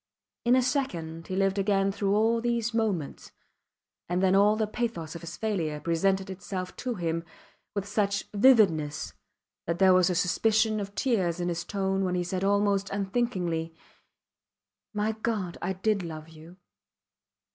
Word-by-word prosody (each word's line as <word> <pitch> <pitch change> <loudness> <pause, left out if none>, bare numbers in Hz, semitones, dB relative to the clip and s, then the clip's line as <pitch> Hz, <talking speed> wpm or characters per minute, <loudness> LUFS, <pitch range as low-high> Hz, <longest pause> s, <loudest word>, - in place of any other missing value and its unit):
In 240 +1 +5
a 255 - +4
second 170 - -2
he 185 - -3
lived 195 +1 +1
again 195 0 +2
through 200 0 0
all 225 +2 +2
these 235 -1 0
moments, 210 -10 -2 0.8
and 175 +1 +1
then 190 0 +4
all 205 +2 +5
the 215 0 0
pathos 215 -8 -3
of 170 - -8
his 170 0 -8
failure 170 -9 -2
presented 190 +4 +1
itself 185 -1 -6
to 250 -2 -3
him 165 -3 -2 0.5
with 200 0 -2
such 205 -1 0
vividness 200 - +3 0.5
that 170 +1 0
there 190 0 +6
was 185 0 +4
a 180 - 0
suspicion 215 +5 +2
of 200 0 -6
tears 190 -7 0
in 175 0 -1
his 175 0 -2
tone 195 0 -1
when 180 -1 0
he 180 - 0
said 185 +1 -3
almost 200 0 +2
unthinkingly, 190 -6 -1 1.2
My 210 0 0
God! 215 -5 -3
I 185 +2 -1
did 200 +2 0
love 160 -2 -7
you! 160 +3 -14
195 Hz, 155 wpm, -28 LUFS, 175-215 Hz, 1.2 s, there